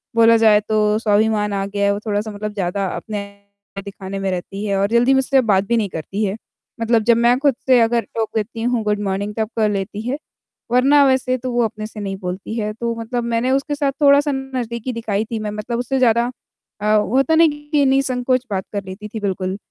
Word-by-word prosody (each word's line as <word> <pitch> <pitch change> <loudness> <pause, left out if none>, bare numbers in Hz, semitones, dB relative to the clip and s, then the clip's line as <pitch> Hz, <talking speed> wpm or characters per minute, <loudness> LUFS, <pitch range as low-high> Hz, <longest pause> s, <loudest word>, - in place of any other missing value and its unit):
बोला 230 0 +6
जाए 220 -2 +5
तो 210 -1 +2
स्वाभिमान 210 -1 +1
आ 195 0 -1
गया 200 0 -1
है, 200 - +3
वो 200 - -3
थोड़ा-सा 210 0 -2
मतलब 210 +1 -5
ज़्यादा 195 0 -2
अपने 210 -2 -5 0.6
दिखाने 195 0 -6
में 195 0 -1
रहती 195 +3 -5
है 200 -1 0
और 200 - +2
जल्दी 245 +3 +4
मुझसे 265 0 +3
बात 190 0 +3
भी 235 - +2
नहीं 210 -3 0
करती 190 +6 -4
है। 195 +1 -2 0.5
मतलब 230 -1 +2
जब 235 +1 +4
मैं 240 +1 +4
खुद 280 -2 +2
से 255 -2 +6
अगर 235 +1 +3
टोक 225 -1 -1
देती 225 +1 -3
हूँ 240 -1 0
गुड 210 -1 0
मॉर्निंग 200 +1 -2
तब 220 -1 -1
कर 215 -1 +3
लेती 200 +1 -3
है, 265 +3 -1 0.5
वरना 275 +4 +5
वैसे 260 -1 +2
तो 255 +1 -5
वो 240 -1 +2
अपने 215 -1 -5
से 215 0 -10
नहीं 195 -1 -4
बोलती 185 +3 -5
है, 215 -1 -2
तो 235 +1 -3
मतलब 240 +1 -3
मैंने 235 +2 0
उसके 275 +2 0
साथ 285 -1 0
थोड़ा-सा 285 +1 +5
नज़दीकी 255 -3 -4
दिखाई 220 -2 -2
थी, 225 0 -4
मैं 210 -1 -4
मतलब 215 +3 -4
उससे 265 +2 -1
ज़्यादा 235 0 +3 0.5
अ, 210 +1 +3
वो 210 +3 0
होता 295 +4 +3
नहीं 325 0 +6 0.2
कि 290 -2 +3
निःसंकोच 260 -1 +1
बात 190 -1 -2
कर 200 -1 -2
लेती 190 +3 -8
थी 220 +1 -6
बिल्कुल, 190 -2 -2
225 Hz, 220 wpm, -20 LUFS, 205-250 Hz, 0.6 s, बोला